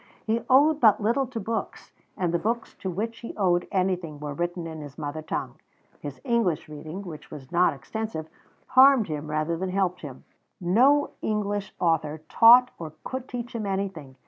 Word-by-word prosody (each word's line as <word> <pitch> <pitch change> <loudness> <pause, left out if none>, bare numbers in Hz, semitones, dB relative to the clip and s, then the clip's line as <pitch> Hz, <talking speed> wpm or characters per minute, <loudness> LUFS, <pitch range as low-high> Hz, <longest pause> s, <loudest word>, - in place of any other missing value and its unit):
He 225 +1 0
owed 290 +4 +5
but 220 -6 +5
little 235 +5 +1
to 240 -2 -5
books, 225 +2 -4 0.3
and 175 -2 -1
the 170 - +2
books 230 +5 -2
to 190 - -3
which 220 +6 -4
he 235 - -8
owed 175 -3 +2
anything 180 -5 -1
were 145 -1 -5
written 175 +2 -3
in 160 -1 -7
his 145 -1 -10
mother 150 +1 -4
tongue. 155 - -5 0.4
His 140 -3 -7
English 230 -9 0
reading, 155 +5 -8
which 165 -5 -9
was 135 -3 -10
not 175 +1 +3
extensive, 160 +3 -5 0.4
harmed 260 -3 +6
him 150 0 -4
rather 155 +2 -1
than 185 +2 -3
helped 185 -1 0
him. 135 -4 -9 0.4
No 255 +11 +3
English 205 -2 -2
author 160 -3 0
taught 245 +2 +7
or 160 -2 -7
could 260 0 -5
teach 245 0 -6
him 220 -3 -3
anything. 190 -9 -4
185 Hz, 175 wpm, -26 LUFS, 155-230 Hz, 0.4 s, taught